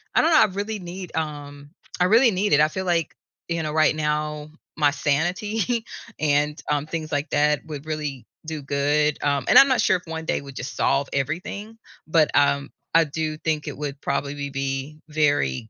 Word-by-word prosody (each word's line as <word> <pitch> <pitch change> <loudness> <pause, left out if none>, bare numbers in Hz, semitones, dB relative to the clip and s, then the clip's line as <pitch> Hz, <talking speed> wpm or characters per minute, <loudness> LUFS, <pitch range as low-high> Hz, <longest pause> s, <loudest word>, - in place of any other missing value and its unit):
I - - +6
don't 330 - +3
know, 315 - +6
I - - +7
really 205 +2 -4
need, 180 0 -8
um, 145 -2 -5 0.3
I 180 - +4
really 230 +5 +5
need 195 -3 0
it. 145 - +6
I 155 - +4
feel 190 +4 -4
like, 170 -3 0 0.4
you 170 -1 -1
know, 155 -1 -3
right 155 0 +3
now 150 0 -2 0.3
my 145 -2 +4
sanity 185 - -1 0.3
and, 150 0 +1
um, 145 0 0
things 155 -1 -5
like 145 +1 -1
that 150 0 +2
would 150 -2 -7
really 150 -5 -4 0.2
do 155 -1 -5
good, 145 +2 +1
um 140 -2 +1
and - - +7
I'm 275 - +8
not 260 - +2
sure 185 - +3
if 180 - -15
1 160 -1 -5
day - - 0
would 140 -1 -11
just 130 +2 -6
solve 135 0 +1
everything, 180 - -3 0.3
but, 160 -1 +3
um, 140 0 +2 0.3
I 165 - +7
do 155 0 -3
think 155 -1 -2
it - - -5
would 145 -1 -5
probably 140 0 -2
be 135 +2 -4
very, 145 - +1
150 Hz, 195 wpm, -23 LUFS, 145-170 Hz, 0.4 s, I'm